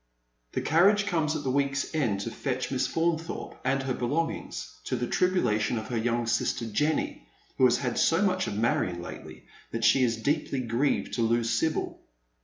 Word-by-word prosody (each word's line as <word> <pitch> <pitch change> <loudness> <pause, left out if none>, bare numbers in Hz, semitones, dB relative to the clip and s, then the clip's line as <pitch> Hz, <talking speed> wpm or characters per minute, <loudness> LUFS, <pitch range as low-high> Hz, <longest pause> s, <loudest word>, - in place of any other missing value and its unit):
The - - -1
carriage 200 +6 +4
comes 160 -5 0
at 150 - -3
the 130 - 0
week's 140 +1 0
end 115 -11 0
to 115 - -4
fetch 130 0 -3
Miss 130 -1 +1
Faunthorpe 165 0 -2
and 135 +1 +1
her 135 -1 -1
belongings, 150 +8 -3
to - - -1
the 120 0 -1
tribulation 120 - +1
of 110 0 -5
her 120 - -1
young 120 +1 0
sister 115 0 0
Jenny, 130 - -1 0.3
who 130 - +6
has 120 -1 +4
had 125 -3 -2
so 165 +4 +3
much 185 -1 +1
of 100 - -3
Marion 95 -6 +1
lately - - -10 0.2
that 115 0 -4
she 135 - +5
is 115 -2 +1
deeply 140 +2 -1
grieved 120 +4 0
to 120 - -1
lose 115 0 +2
Sibyl. 155 +8 -1
130 Hz, 185 wpm, -28 LUFS, 115-155 Hz, 0.3 s, who